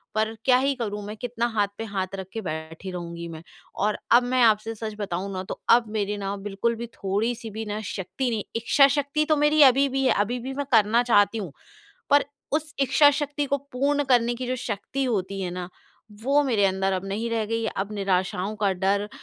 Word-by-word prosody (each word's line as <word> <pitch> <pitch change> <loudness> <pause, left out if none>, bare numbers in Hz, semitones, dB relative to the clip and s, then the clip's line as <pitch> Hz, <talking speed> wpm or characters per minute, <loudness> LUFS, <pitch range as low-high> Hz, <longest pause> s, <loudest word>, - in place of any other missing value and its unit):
पर 220 +1 +1
क्या 250 -1 +6
ही 275 +2 +1
करूँ, 210 -4 -4
मैं 210 +1 -6
कितना 235 0 -2
हाथ 205 -2 +2
पे 225 - -4
हाथ 200 -4 -2
रख 190 -1 -6
के 225 - -3
बैठी 160 +2 -6
रहूँगी 170 -1 -6
मैं? 160 -1 -8 0.3
और 210 +2 0
अब 240 +1 +7
मैं 255 +1 +1
आपसे 220 0 +3
सच 220 0 -5
बताऊँ 195 -1 -3
ना 185 0 -3
तो - - -7
अब 235 -1 +5
मेरे 210 -1 -1
ना 200 0 -3
बिल्कुल 205 +4 -2
भी 235 +1 -6
थोड़ी-सी 225 +3 -2
भी 220 +2 -5
ना 210 0 -3
शक्ति 210 +7 -3
नहीं 220 -3 -2
इच्छाशक्ति 280 +5 +3
तो 310 - +5
मेरी 295 +1 +4
अभी 275 +1 +6
भी 270 +1 -1
है, - - +4
अभी 230 +5 0
भी 260 +3 -5
मैं 285 +1 -3
करना 220 +3 +4
चाहती 205 -2 +3
हूँ। 190 -8 -5 0.6
पर 285 0 +5 0.3
उस 305 0 -1
इच्छाशक्ति 290 +2 +3
को 280 - +1 0.2
पूर्ण 285 +3 +1
करने 240 -1 +3
की 250 +1 -5
जो 255 +1 -1
शक्ति 265 +7 -3
होती 195 -5 -2
है 180 -2 -2
ना 180 0 -5 0.5
वो 280 +4 +3
मेरे 230 -8 +2
अंदर 190 0 +1
अब 185 0 -2
नहीं 210 +4 -2
रह 225 -1 0
गई 230 +1 -1
है। 220 - -1
अब 200 +2 -2
निराशाओं 190 0 -1
का 200 -2 +2
डर, 200 +2 0
220 Hz, 210 wpm, -25 LUFS, 195-255 Hz, 0.6 s, अब